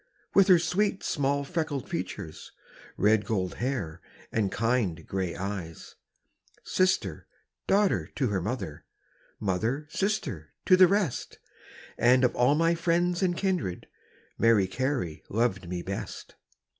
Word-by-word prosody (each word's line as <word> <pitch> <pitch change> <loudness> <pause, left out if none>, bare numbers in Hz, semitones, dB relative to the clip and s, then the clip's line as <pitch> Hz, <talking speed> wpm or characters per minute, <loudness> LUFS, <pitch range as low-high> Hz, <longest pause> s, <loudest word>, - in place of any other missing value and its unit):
With 195 -1 +6
her 185 -3 +8
sweet 190 +4 0
small 140 0 0
freckled 155 -3 -3
features, 90 -2 -6 0.5
Red 105 +1 +3
gold 95 -5 -1
hair, 120 -12 -2 0.3
and 105 -4 0
kind 105 -8 0
grey 95 -2 -2
eyes; 95 -4 -6 0.7
Sister, 185 - 0 0.4
daughter, 200 0 +2
to 130 -5 0
her 95 -3 -1
mother, 100 - -4 0.6
Mother, 110 +9 -1
sister, 150 - -2
to 185 - +7
the 185 0 +8
rest 195 - -1 0.6
And 125 +2 +5
of 125 - +2
all 125 +4 +4
my 165 +2 +3
friends 175 +1 +1
and 175 -2 +1
kindred, 180 - -1 0.5
Mary 115 -4 +5
Carey 120 - -2
loved 95 -5 0
me 90 -1 -3
best. 95 +1 -6
125 Hz, 125 wpm, -28 LUFS, -, 0.7 s, her